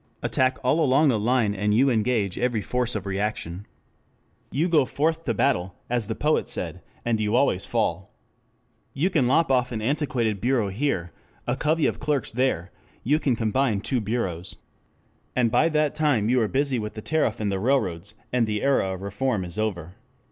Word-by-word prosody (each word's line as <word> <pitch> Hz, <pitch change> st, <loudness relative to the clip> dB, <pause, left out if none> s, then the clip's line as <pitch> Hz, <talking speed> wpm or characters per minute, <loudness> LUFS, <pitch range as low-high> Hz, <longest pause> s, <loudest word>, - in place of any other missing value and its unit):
Attack 130 Hz, 0 st, +1 dB
all 130 Hz, +6 st, +2 dB
along 140 Hz, +2 st, +4 dB
the 115 Hz, -5 st, +2 dB
line 115 Hz, -1 st, +2 dB
and 105 Hz, +1 st, 0 dB
you 135 Hz, +4 st, +4 dB
engage 110 Hz, -4 st, 0 dB
every 120 Hz, -4 st, 0 dB
force 125 Hz, +1 st, 0 dB
of 100 Hz, -2 st, -3 dB
reaction. 100 Hz, -2 st, -3 dB, 0.8 s
You 155 Hz, +6 st, 0 dB
go 160 Hz, -5 st, +4 dB
forth 160 Hz, +5 st, -1 dB
to 115 Hz, -, 0 dB
battle, 100 Hz, -7 st, 0 dB, 0.2 s
as 120 Hz, -4 st, +2 dB
the -, -, -3 dB
poet -, -, 0 dB
said, -, -, -4 dB, 0.2 s
and 115 Hz, -2 st, +1 dB
you 105 Hz, +1 st, 0 dB
always 125 Hz, -8 st, +2 dB
fall. 95 Hz, -6 st, -1 dB, 0.8 s
You 170 Hz, +8 st, +1 dB
can 140 Hz, -8 st, +2 dB
lop 150 Hz, +3 st, +3 dB
off 125 Hz, -1 st, +2 dB
an 115 Hz, -, -3 dB
antiquated 115 Hz, -5 st, -1 dB
bureau 120 Hz, -4 st, +1 dB
here, 95 Hz, -6 st, -2 dB, 0.3 s
a 120 Hz, -, 0 dB
covey 155 Hz, +3 st, +1 dB
of -, -, 0 dB
clerks 145 Hz, -2 st, -1 dB
there, 115 Hz, -8 st, 0 dB, 0.3 s
you 150 Hz, +6 st, +2 dB
can 135 Hz, -6 st, +1 dB
combine 110 Hz, -1 st, 0 dB
two 125 Hz, +2 st, -1 dB
bureaus. 95 Hz, -5 st, -3 dB, 0.8 s
And 120 Hz, -3 st, +2 dB
by 165 Hz, -, +3 dB
that 150 Hz, -2 st, +1 dB
time 145 Hz, -9 st, +1 dB
you 125 Hz, 0 st, +3 dB
are 110 Hz, -, +2 dB
busy 135 Hz, +1 st, 0 dB
with 105 Hz, -1 st, -5 dB
the 110 Hz, -, -7 dB
tariff 150 Hz, -8 st, 0 dB
and 105 Hz, -2 st, -1 dB
the 95 Hz, -, -1 dB
railroads, 95 Hz, -8 st, -1 dB, 0.2 s
and 120 Hz, -3 st, +2 dB
the 105 Hz, -1 st, -2 dB
era 115 Hz, -9 st, +2 dB
of 95 Hz, -, -9 dB
reform 105 Hz, 0 st, -1 dB
is 90 Hz, +4 st, -6 dB
over. 90 Hz, -6 st, -3 dB
120 Hz, 185 wpm, -25 LUFS, 105-135 Hz, 0.8 s, along